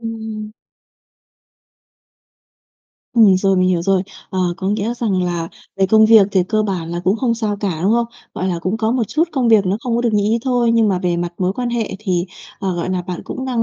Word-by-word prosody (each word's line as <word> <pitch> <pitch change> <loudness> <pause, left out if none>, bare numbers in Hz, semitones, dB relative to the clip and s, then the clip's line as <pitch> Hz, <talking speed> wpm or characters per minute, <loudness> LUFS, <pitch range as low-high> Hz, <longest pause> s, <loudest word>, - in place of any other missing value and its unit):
Ừm. 220 -2 -6 2.6
Ừm, 215 -5 +6
rồi, 195 0 +2
mình 185 0 +3
hiểu 175 -2 +1
rồi. 190 0 +2 0.3
Ờ, 190 - -3 0.2
có 190 0 -3
nghĩa 215 +3 -1
rằng 210 -6 -1
là 170 -2 -2 0.3
về 195 0 +2
công 220 +2 +5
việc 220 -3 +7
thì 190 -2 +3
cơ 215 -1 +1
bản 180 -5 -3
là 175 - -3
cũng 190 +4 +2
không 235 0 0
sao 215 -3 -2
cả, 185 -6 -2
đúng 200 +4 +3
không? 235 0 +2 0.3
Gọi 185 - -2
là 175 -2 -1
cũng 185 +5 -2
có 220 0 0
một 250 -1 +1
chút 325 +3 +1
công 255 -5 +1
việc 215 -4 +5
nó 190 +2 +1
không 235 -1 -1
có 240 - 0
được 235 -2 +1
như 205 -1 +2
ý 225 +2 +2
thôi, 245 -3 +2
nhưng 225 -2 +3
mà 190 -2 +1
về 180 -1 -1
mặt 175 0 -3
mối 185 0 0
quan 245 +2 -3
hệ 235 -2 -2
thì, 185 -4 -1 0.3
ờ, 190 -3 -2
gọi 175 +2 -3
là, 180 -1 -1
bạn 180 -1 -6
cũng 260 - -5
đang 245 -3 0
205 Hz, 235 wpm, -18 LUFS, 185-230 Hz, 2.6 s, việc